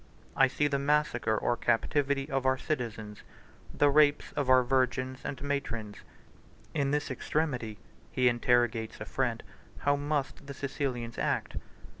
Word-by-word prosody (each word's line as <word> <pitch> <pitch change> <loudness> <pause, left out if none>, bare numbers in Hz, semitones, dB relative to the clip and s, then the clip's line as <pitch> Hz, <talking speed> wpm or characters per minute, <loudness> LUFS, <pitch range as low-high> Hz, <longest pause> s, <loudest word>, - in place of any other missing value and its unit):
I 135 - +6
see 145 +3 +1
the 140 -1 0
massacre 140 -6 +1
or 120 - +1
captivity 135 +4 +1
of 135 -3 -1
our 130 0 +2
citizens, 115 -8 -4 0.5
the 145 - +3
rapes 145 0 +4
of 140 -3 -2
our 130 0 +6
virgins 130 0 0
and 140 - -4
matrons. 115 -7 -3 0.8
129 150 - 0
In 140 - +1
this 145 0 -1
extremity 125 -5 -2 0.3
(he 125 -1 +2
interrogates 120 -2 +1
a - - -5
friend) - - -1 0.4
how 145 0 +4
must 145 -1 -2
the 140 - -7
Sicilians 130 -4 -3
act? - - -1
130 Hz, 145 wpm, -30 LUFS, 120-145 Hz, 0.8 s, I